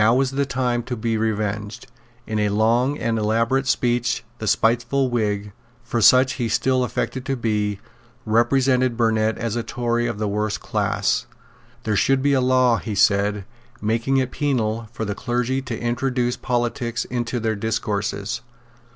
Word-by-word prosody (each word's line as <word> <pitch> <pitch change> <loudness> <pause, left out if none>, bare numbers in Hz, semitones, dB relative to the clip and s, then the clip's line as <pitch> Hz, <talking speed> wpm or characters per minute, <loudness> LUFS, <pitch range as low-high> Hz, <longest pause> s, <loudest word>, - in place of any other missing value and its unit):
Now 115 +3 +5
was 135 0 +1
the 140 0 0
time 125 -2 0
to 125 - -2
be 115 +1 -1
revenged. 105 -1 -2 0.4
In 110 -1 -2
a 105 -1 +2
long 115 +7 +2
and 115 -4 -1
elaborate 115 +5 +1
speech 120 -1 +1 0.2
the 110 - -4
spiteful 120 +5 +2
Whig 105 -3 -1 0.3
for 120 -1 -2
such 130 +4 +6
he 115 - 0
still 125 +3 +2
affected 130 +1 -3
to 135 - 0
be 105 -4 -1 0.5
represented 125 +2 +2
Burnet 110 -1 +1
as 115 -1 -2
a 120 - 0
Tory 120 0 -1
of 115 -3 -3
the 105 0 -1
worst 105 0 -1
class. - - 0 0.6
"There 110 - 0
should 135 +5 +2
be 145 0 +3
a 130 - +3
law," 125 -2 +3
he 110 -3 -5
said, 100 0 +2 0.3
"making 115 +5 0
it 130 -1 0
penal 115 -6 -1
for 110 -2 -4
the 100 - -2
clergy 125 +4 -1
to 125 -4 -5
introduce 120 +1 0
politics 120 -1 -2
into 120 0 -2
their 110 -1 -1
discourses. 100 -1 -2
115 Hz, 160 wpm, -22 LUFS, 110-125 Hz, 0.6 s, such